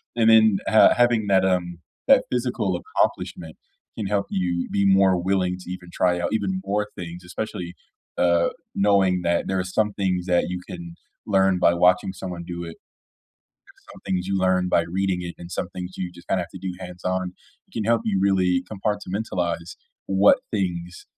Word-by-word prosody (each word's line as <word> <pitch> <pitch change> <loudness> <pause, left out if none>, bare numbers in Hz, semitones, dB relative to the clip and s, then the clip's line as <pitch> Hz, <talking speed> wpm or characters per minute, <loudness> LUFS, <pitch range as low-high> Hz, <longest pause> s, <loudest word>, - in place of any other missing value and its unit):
And 115 -1 +4
then, 110 -2 +6
uh, 110 - +6
having 120 -3 +3
that, 95 -1 +4
um, 90 -2 -1 0.3
that 270 -1 +6
physical 120 -7 -1
accomplishment 80 -2 -2 0.4
can 105 - -2
help 100 0 0
you 90 -2 -1
be 100 0 +1
more 95 -1 +4
willing 90 -1 0
to 90 - -9
even 90 -1 -8
try 90 0 +1
out 85 - -2
even 95 -3 -1
more 105 +2 -1
things, 90 -1 -8
especially, 90 -2 -5 0.4
uh, 85 -1 +3 0.3
knowing 100 -2 +3
that 85 0 0
there 95 0 0
are - - 0
some 105 +3 0
things 95 -3 -1
that 90 -1 +2
you 90 0 -4
can 85 -1 -8 0.3
learn 95 -2 +3
by 85 - +4
watching 90 +2 +3
someone 90 -2 -6
do 85 0 -6
it. 85 -1 -8 0.9
There's - - -23
some - - -14
things 90 -1 -1
you 100 0 0
learn 95 -1 +2
by 85 - +3
reading 90 +2 -1
it, 85 -1 -6
and 85 0 -10
some - - -3
things 90 0 -7
you 90 -1 -4
just 85 0 -16
kinda 95 - +1
have 85 - -8
to - - -8
do 95 -1 -4
hands 90 -1 -9
on, 95 0 -1 0.3
it - - -34
can 110 - -3
help 115 +1 +2
you 100 -3 0
really 90 -2 +2
compartmentalize 95 -4 -3 0.3
what 95 +1 +5
things, 90 -4 -3
95 Hz, 185 wpm, -23 LUFS, 90-100 Hz, 0.9 s, then